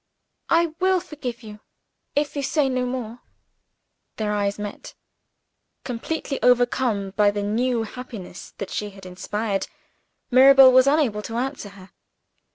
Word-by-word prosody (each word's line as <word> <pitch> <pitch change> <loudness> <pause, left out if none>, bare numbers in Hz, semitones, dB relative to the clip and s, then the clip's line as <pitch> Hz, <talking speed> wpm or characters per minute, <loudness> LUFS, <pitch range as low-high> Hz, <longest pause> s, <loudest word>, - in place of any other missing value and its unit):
"I 335 -1 +2
will 375 0 +3
forgive 260 -9 -7
you 210 -1 -10 0.6
if 290 +1 0
you 285 - -1
say 280 0 +1
no 255 -1 -1
more." 245 -2 -5 1.0
Their 210 -1 -2
eyes 200 -1 -1
met. 205 -1 -8 0.9
Completely 270 +3 -4
overcome 245 -5 +2
by 205 +1 +3
the 205 0 -3
new 230 +3 0
hope 250 +3 -9 0.5
that 200 - -6
she 210 - -3
had 195 -1 -14
inspired, 195 +3 -3 0.6
Mirabel 265 +1 +8
was 260 +1 +5
unable 275 -8 +2
to 225 +2 -7
answer 260 -4 -3
her. 195 -1 -15
245 Hz, 135 wpm, -23 LUFS, 210-270 Hz, 1.0 s, Mirabel